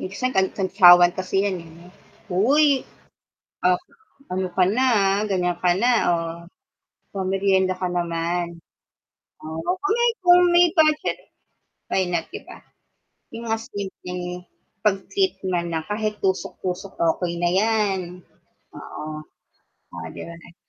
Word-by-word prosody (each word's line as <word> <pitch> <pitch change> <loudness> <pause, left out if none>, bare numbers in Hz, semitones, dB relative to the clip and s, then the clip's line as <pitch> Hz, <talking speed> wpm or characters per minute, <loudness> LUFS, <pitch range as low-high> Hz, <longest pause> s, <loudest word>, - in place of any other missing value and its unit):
minsan 255 +7 -3
kan 190 0 +3
kantyawan 180 -2 +6
kasi 195 +1 0
yan, 190 -3 -2
eh, 165 - -13
no. 170 +3 -16 0.4
"Hoy, 265 +12 +4 1.0
op 180 0 +3 0.5
ano 185 0 -1
ka 185 - +5
na, 260 - +3 0.3
ha, 215 - -1
ganiyan 180 -2 -1
ka 180 - +2
na, 245 +2 +3 0.2
oh, 165 -1 0 0.9
pa-merienda 190 0 +1
ka 180 - 0
naman." 170 0 -2 0.8
Oo, 160 - -5
kung 395 - 0
may 475 0 +4
kung 355 0 +7
may 350 0 +7
budget, 310 -1 +3 0.7
why 190 - +2
not 175 -2 -2
'di - - -7
ba? - - -12 0.7
Yung 230 0 -6
mga 225 - +1
simpleng 180 -3 -6 0.6
pag-treat 195 -2 +1 0.2
man 170 -2 -2
lang 160 -1 -2
kahit 215 0 -3
tusok-tusok, 190 0 -3 0.2
okey 175 -2 -2
na 175 - +2
yan, 205 +1 +1 0.8
oo. - - -8 0.9
Oh, 85 -1 -7
'di - - -9
ba 170 - -9
nag 170 - -16
185 Hz, 135 wpm, -23 LUFS, 175-210 Hz, 1.0 s, kung